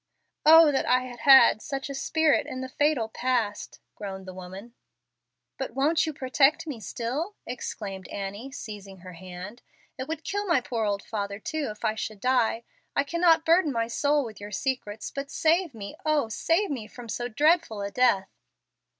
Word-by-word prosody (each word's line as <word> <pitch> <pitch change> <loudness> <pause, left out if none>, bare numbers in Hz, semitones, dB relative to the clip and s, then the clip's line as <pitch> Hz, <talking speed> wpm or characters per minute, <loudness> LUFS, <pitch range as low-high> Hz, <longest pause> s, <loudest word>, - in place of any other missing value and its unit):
"Oh 320 -1 +9
that 270 - 0
I 255 0 +4
had 245 -2 -9
had 265 -4 +7
such 275 -1 -4
a 280 - -5
spirit 315 +2 +2
in 255 - -5
the 260 - -5
fatal 290 -4 +1
past!" 230 -3 -2
groaned 190 -2 -7
the 185 - -8
woman. 190 +5 -10 0.9
"But 265 - -4
won't 310 +4 +2
you - - -1
protect 275 +1 +2
me 285 -7 -6
still?" 260 - -4
exclaimed 200 -6 -6
Annie, 200 +6 -6
seizing 205 -7 -9
her 185 0 -10
hand. 185 +6 -9 0.4
"It 260 - -4
would 320 0 -4
kill 405 +1 -2
my 340 - +4
poor 235 -3 -2
old 200 -1 -1
father 200 -2 -4
too, 295 +7 -3
if 210 +2 -7
I 215 - +2
should 215 -1 -5
die. 240 -1 +1 0.3
I 280 - +3
cannot 330 +1 +3
burden 330 -2 +4
my 230 -2 -1
soul 285 +4 +1
with 215 -3 -10
your 205 - -7
secrets, 215 -2 -3
but 275 0 -5
save 330 -2 +1
me 200 -2 -7
oh, 300 -6 +1
save 335 - +1
me, 235 -6 -4
from 240 +1 -11
so 240 +2 -3
dreadful 290 - +2
a 200 - -4
death!" 205 -6 +2
250 Hz, 180 wpm, -27 LUFS, 210-295 Hz, 0.9 s, Oh